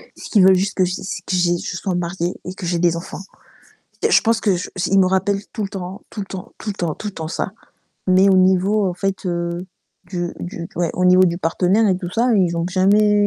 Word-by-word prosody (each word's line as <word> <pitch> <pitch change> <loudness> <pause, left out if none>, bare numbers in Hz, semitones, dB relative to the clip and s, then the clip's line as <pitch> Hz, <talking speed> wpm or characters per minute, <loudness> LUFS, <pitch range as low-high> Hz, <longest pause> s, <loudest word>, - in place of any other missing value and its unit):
Ce - - -10
qu'ils 205 -4 +5
veulent 190 0 +7
juste 195 +2 -1
que 185 - +4
j'aie, 180 +1 -3
c'est 190 -1 -5
que 185 - -1
j'aie 175 -1 +2
que - - -5
je 180 - -4
sois 185 -1 -2
mariée 175 0 -2
et 185 - -5
que 185 - -7
j'ai 175 0 0
des 170 -1 +2
enfants. 170 +2 -7 0.9
Je - - +6
pense 230 -1 +2
que 195 -4 +2
je 175 - -5 0.2
ils 195 - +3
me 185 - +5
rappellent 195 +2 0
tout 220 - -3
le 195 - -2
temps, 190 0 -7
tout - - -12
le 195 - -5
temps, 190 -1 -8
tout 210 - -4
le - - -4
temps, 170 -5 -2
tout 210 - -7
le 200 - -9
temps 160 -1 -5
ça. - - -3 0.5
Mais 185 +1 +5
au 190 - +5
niveau, 190 +3 +3
en 175 - -3
fait, 195 0 -3
heu, 170 +1 -3 0.4
du 175 -1 -3
du 170 -1 -6
ouais, 170 -2 0
au 180 - 0
niveau 180 +1 +6
du 170 -1 +1
partenaire 185 +6 +2
et 185 - +2
tout 180 -2 -6
ça, 235 +4 +1
ils 175 -4 +2
ont 170 +1 -1
jamais 205 +2 +3
185 Hz, 260 wpm, -20 LUFS, 175-195 Hz, 0.9 s, veulent